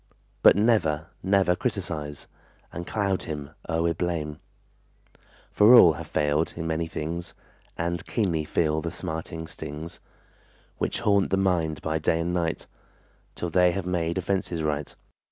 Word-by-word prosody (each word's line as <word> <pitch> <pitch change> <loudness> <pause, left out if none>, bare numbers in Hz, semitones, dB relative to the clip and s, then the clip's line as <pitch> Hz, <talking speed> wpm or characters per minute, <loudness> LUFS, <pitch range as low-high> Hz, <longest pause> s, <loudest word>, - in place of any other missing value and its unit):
But - - +8
never, 90 -8 +2
never 95 -2 +3
criticize 85 - -4 0.5
And 85 0 -6
cloud 100 -3 0
him 75 -3 -5 0.2
o'er 80 +1 +1
with 85 -1 0
blame; 80 -4 -2 1.1
For 110 +4 +7
all 85 -9 +9
have 70 - -8
failed 75 +2 0
in 80 - -4
many 80 0 -1
things 85 +2 -5 0.4
And 85 0 -2
keenly 90 -9 0
feel 80 0 0
the 85 - -3
smarting 80 -1 -5
stings, 80 +1 -7 0.8
Which - - -1
haunt 100 -2 +3
the 95 - +2
mind 85 -6 0
by 80 0 -1
day 80 +1 +1
and 85 +1 -1
night 85 -2 -1 0.7
Till 85 - -4
they 90 0 +4
have 95 0 -3
made 85 -2 -1
offenses 90 -3 -1
right. 75 -1 -2
85 Hz, 145 wpm, -26 LUFS, 80-90 Hz, 1.1 s, all